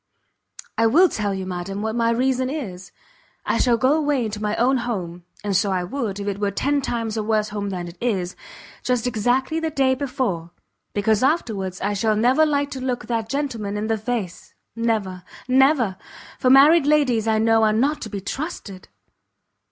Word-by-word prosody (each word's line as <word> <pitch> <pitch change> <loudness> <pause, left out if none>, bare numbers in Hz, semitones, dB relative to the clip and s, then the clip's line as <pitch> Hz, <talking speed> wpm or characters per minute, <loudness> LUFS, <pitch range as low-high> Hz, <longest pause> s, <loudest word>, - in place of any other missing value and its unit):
"I 225 - +5
will 340 +10 +5
tell 205 -2 -2
you, 190 -1 -3
madam, 185 +2 -4
what 220 0 -2
my 230 -1 +2
reason 255 +2 +1
is; 190 - -6 0.5
I - - 0
shall 240 -2 +3
go 260 +4 +3
away 290 -7 0
to 210 0 -6
my 210 0 -1
own 260 +3 +2
home, 180 -8 -4 0.2
and 205 -2 -1
so 195 +2 +2
I 185 -1 0
would 205 0 -3
if 200 - -5
it 200 -1 -2
were 205 -1 +1
ten 280 +8 0
times 230 -4 -3
a - - 0
worse 215 0 0
home 205 -1 -4
than 180 -2 -4
it 170 - -11
is! 190 -7 -1 0.5
just 250 -2 0
exactly 250 +6 0
the 325 0 -1
day 270 -3 +2
before. 255 - -2 0.5
Because 210 +1 +2
afterwards 215 - 0
I 205 +2 0
shall 215 +2 +1
never 255 +8 +3
like 285 -1 0
to 260 - -5
look 250 -2 -2
that 225 -2 -2
gentleman 235 -8 -3
in 210 - -2
the 220 0 0
face, 215 -5 -4 0.2
never, 215 -6 -1 0.3
never! 260 -6 +3 0.4
for 255 - +2
married 285 +3 +6
ladies 260 -7 +2
I 220 -1 +3
know 225 0 +3
are 215 -1 +4
not 280 +7 +1
to 220 - -5
be 200 -1 -5
trusted!" 205 - -6
225 Hz, 190 wpm, -22 LUFS, 200-260 Hz, 0.5 s, married